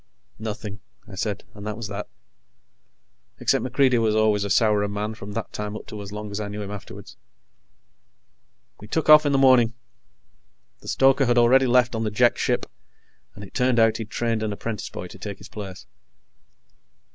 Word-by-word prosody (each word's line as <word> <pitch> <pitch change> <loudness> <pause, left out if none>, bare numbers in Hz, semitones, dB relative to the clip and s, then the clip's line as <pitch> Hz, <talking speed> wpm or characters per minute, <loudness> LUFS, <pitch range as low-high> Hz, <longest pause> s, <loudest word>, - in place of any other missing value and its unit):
"Nothing," 105 -2 -6 0.3
I 105 - -12
said, 100 +1 -3
and 100 - -11
that 105 0 -4
was 115 -2 -5
that, 100 +1 -6 1.3
except - - +1
MacReidie 130 -1 +2
was 110 -1 +2
always 110 -2 +2
a 100 - -3
sourer 105 0 +3
man 105 +2 -3
from 105 -2 -9
that 115 +1 -5
time 105 0 -4
up - - -8
to 105 - -8
as 100 -1 -9
long 105 0 -6
as 100 - -4
I 105 - -3
knew 105 +1 -5
him 100 - -7
afterwards. 100 -3 -10 1.6
We 105 - -11
took 160 +7 -1
off 155 0 +8
in - - +2
the 140 - +3
morning. 125 -4 +5 1.0
The - - -15
stoker 135 0 +3
had 120 0 +2
already 130 +3 +5
left 125 0 +3
on 110 0 -2
the 110 - 0
Jek 120 +3 +2
ship, - - 0 0.7
and 100 - -10
it 95 - -12
turned 125 -1 +1
out 115 -1 +4
he'd 110 -2 -6
trained 115 -1 -1
an 110 -1 -2
apprentice 105 0 -5
boy - - -7
to - - -13
take - - -6
his - - -13
place. 100 -3 -8
110 Hz, 190 wpm, -24 LUFS, 105-120 Hz, 1.6 s, off